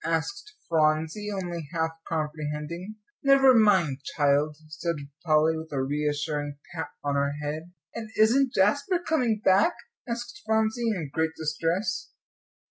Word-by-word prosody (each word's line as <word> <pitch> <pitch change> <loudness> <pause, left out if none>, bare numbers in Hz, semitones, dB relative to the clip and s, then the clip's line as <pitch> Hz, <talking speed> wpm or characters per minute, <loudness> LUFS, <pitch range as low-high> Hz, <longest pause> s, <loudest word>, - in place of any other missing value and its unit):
asked 400 - -2
Phronsie, 160 +5 +1
only 175 -6 -4
half 160 -1 0 0.2
comprehending. 155 +4 -3 0.3
"Never 275 -1 +6
mind, 190 - +4 0.2
child," 145 +1 +2
said 170 +2 -3 0.3
Polly, 155 -1 +3
with 160 0 -7
a 135 -2 0
reassuring 145 0 -2 0.2
pat 160 - -3 0.2
on 145 -1 0
her 140 0 +1
head. 155 +4 -4 0.2
"And 220 -1 -6
isn't 245 +5 +4
Jasper 285 - +3
coming 255 -11 0
back?" 190 +3 +5 0.3
asked 240 +1 -5
Phronsie, 220 +2 +1
in 170 -10 -3
great 160 0 0
distress. 165 +6 -1
165 Hz, 130 wpm, -27 LUFS, 150-220 Hz, 0.3 s, Never